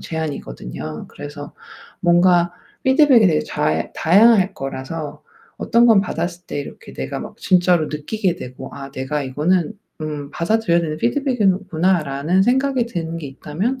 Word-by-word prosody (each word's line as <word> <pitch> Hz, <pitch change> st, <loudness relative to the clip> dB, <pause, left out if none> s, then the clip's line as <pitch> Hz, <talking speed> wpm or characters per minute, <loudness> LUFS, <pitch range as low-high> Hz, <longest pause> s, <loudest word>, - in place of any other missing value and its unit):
제안이거든요. 80 Hz, -, -6 dB
그래서 145 Hz, 0 st, -9 dB, 0.5 s
뭔가 175 Hz, -1 st, +4 dB, 0.3 s
피드백이 265 Hz, -3 st, +5 dB
되게 155 Hz, -3 st, +3 dB
잘 80 Hz, +1 st, -1 dB
다양할 195 Hz, +2 st, +5 dB
거라서 145 Hz, +3 st, -6 dB, 0.4 s
어떤 235 Hz, +1 st, +3 dB
건 225 Hz, -4 st, +6 dB
받았을 175 Hz, -2 st, -4 dB
때 -, -, -4 dB
이렇게 140 Hz, -, -10 dB
내가 65 Hz, 0 st, -5 dB
막 -, -, -9 dB
진짜로 180 Hz, -3 st, +3 dB
느끼게 175 Hz, +6 st, -2 dB
되고 130 Hz, -2 st, -8 dB
'아 140 Hz, -1 st, -8 dB
내가 140 Hz, +2 st, -3 dB
이거는 150 Hz, +6 st, 0 dB, 0.3 s
음 150 Hz, -2 st, -5 dB
받아들여야 175 Hz, -1 st, +1 dB
되는 155 Hz, -2 st, -3 dB
피드백이구나.'라는 190 Hz, -, +1 dB
생각이 260 Hz, +1 st, +2 dB
드는 165 Hz, -7 st, -4 dB
게 150 Hz, -, -6 dB
있다면 180 Hz, -, -3 dB
170 Hz, 330 characters per minute, -20 LUFS, 145-195 Hz, 0.5 s, 건